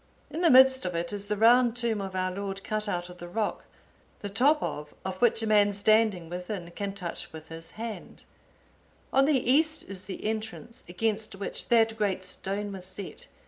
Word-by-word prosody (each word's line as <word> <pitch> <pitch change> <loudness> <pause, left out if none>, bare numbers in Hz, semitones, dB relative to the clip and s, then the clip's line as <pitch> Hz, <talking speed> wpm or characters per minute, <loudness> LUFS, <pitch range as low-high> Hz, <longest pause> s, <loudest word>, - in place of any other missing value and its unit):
(862) - - -8
In 330 - -2
the 315 -8 +8
midst 260 0 +6
of 180 - -4
it 170 +3 -2
is 205 0 -4
the 210 0 -2
round 240 +2 +5
tomb 235 -4 -1
of 190 -1 -6
our 185 0 0
Lord 195 +1 -5
cut 215 -1 -2
out 175 -2 -2
of 180 0 -12
the 175 - -7
rock, 210 +4 -2 0.6
the 205 - -4
top 275 +9 +4
of 150 0 -5
of 190 0 -5
which 230 -2 +3
a - - -1
man 205 -1 +4
standing 205 -3 +3
within 180 0 -6
can 200 +2 -4
touch 180 -4 -6
with 160 0 -11
his 165 0 -8
hand; 225 -1 -7 0.9
on 270 0 +5
the 275 -5 +2
east 310 +3 +3
is 190 -2 -7
the 190 +1 -7
entrance, 220 +2 -5
against 215 +3 -1
which 195 0 -4
that 225 -1 +4
great 195 -3 0
stone 200 +2 -2
was 185 -2 -8
set. 190 +1 -8
205 Hz, 200 wpm, -28 LUFS, 185-225 Hz, 0.9 s, the